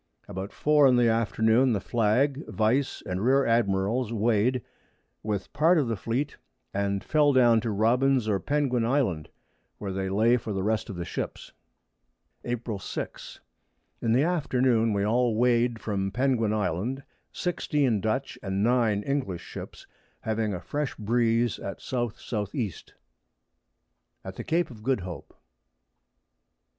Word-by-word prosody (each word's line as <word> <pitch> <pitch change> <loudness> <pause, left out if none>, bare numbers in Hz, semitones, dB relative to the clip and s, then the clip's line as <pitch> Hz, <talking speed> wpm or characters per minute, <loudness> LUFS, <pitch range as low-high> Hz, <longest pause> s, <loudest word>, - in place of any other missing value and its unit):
About 95 +2 -6
4 150 -2 +4
in 130 - +4
the 120 -1 +4
Afternoon 115 +2 +2
the 105 - 0
Flag, 125 +8 +1
Vice 120 +6 0
and 90 +2 -3
Rear 135 +3 +4
Admirals 115 +1 +1
weigh'd, 115 +2 +1 0.6
with 105 -2 -4
part 165 +4 +4
of 145 -5 +2
the 115 - -1
Fleet, 120 +8 -3 0.4
and 100 0 -1
fell 150 -2 +3
down 120 -3 +5
to 115 - -2
Robins 120 +4 +2
or 100 -2 +1
Penguin 140 -4 0
Island, 115 - 0 0.5
where 100 -2 -5
they 95 0 -2
lay 110 +5 +3
for 110 -3 -5
the 95 -1 -2
rest 110 +1 -1
of 100 - -5
the 85 0 -4
Ships. - - -5 0.9
April 120 -4 -3
6. - - -7 0.6
In 115 - 0
the 125 +5 +4
Afternoon 130 -9 +2
we 100 -1 0
all 120 +1 +2
weigh'd 120 0 +2
from 100 -3 -2
Penguin 120 -1 +1
Island, 110 +6 -2 0.3
16 145 - 0
Dutch 110 +6 -2
and 95 0 -1
9 115 -4 +2
English 130 -11 -2
Ships, - - -9 0.4
having 110 -1 -1
a 90 - -3
fresh 145 +11 -3
Breeze 115 +1 +1
at 100 - -6
S. - - -11
S. 110 -4 -3
E. 115 -6 0
[Sidenote: - - -15 1.3
_At - - -7
the - - -5
Cape 165 -1 0
of 110 -3 -12
Good 125 -1 0
Hope. 90 -4 -8
115 Hz, 150 wpm, -27 LUFS, 105-130 Hz, 1.3 s, down